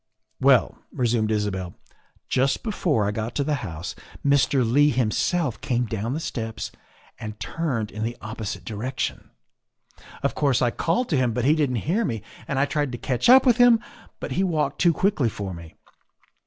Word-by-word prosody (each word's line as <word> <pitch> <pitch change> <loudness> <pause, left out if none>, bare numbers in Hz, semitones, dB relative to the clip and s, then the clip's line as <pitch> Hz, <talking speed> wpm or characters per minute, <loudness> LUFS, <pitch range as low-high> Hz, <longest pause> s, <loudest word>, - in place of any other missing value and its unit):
" 110 - -48
Well," 125 -7 +4
resumed 115 -3 +1
Isabel, 100 -4 -2 0.3
" - - -37
just 135 +2 +1
before 170 - 0
I - - 0
got 110 +2 -4
to 140 - +1
the 150 +2 0
house 85 0 -5 0.3
Mr. 140 -1 +3
Leigh 145 +5 +4
himself 125 +3 0
came 125 -3 0
down 115 +3 -3
the - - -2
steps 110 -8 -4 0.5
and 110 -2 -7
turned 130 -11 -2
in 110 - -7
the 120 +2 -2
opposite 110 -1 -6
direction. 115 +4 -4 0.9
Of - - +1
course, 140 -5 +2
I 120 -1 +2
called 180 - 0
to 150 - +2
him, 125 -3 +1
but 125 +1 -1
he 145 - +5
didn't 145 -5 +1
hear 200 +9 +1
me, 115 - -3 0.2
and 140 - -2
I 135 - +3
tried 145 -2 -1
to - - -3
catch 125 - 0
up 260 +2 +8
with 245 -3 +5
him, 245 -2 +6 0.4
but - - -5
he 190 - +1
walked 150 -6 0
too 175 - +6
quickly 165 - +1
for 100 -3 -5
me. 85 -2 -11
125 Hz, 185 wpm, -24 LUFS, 110-150 Hz, 0.9 s, up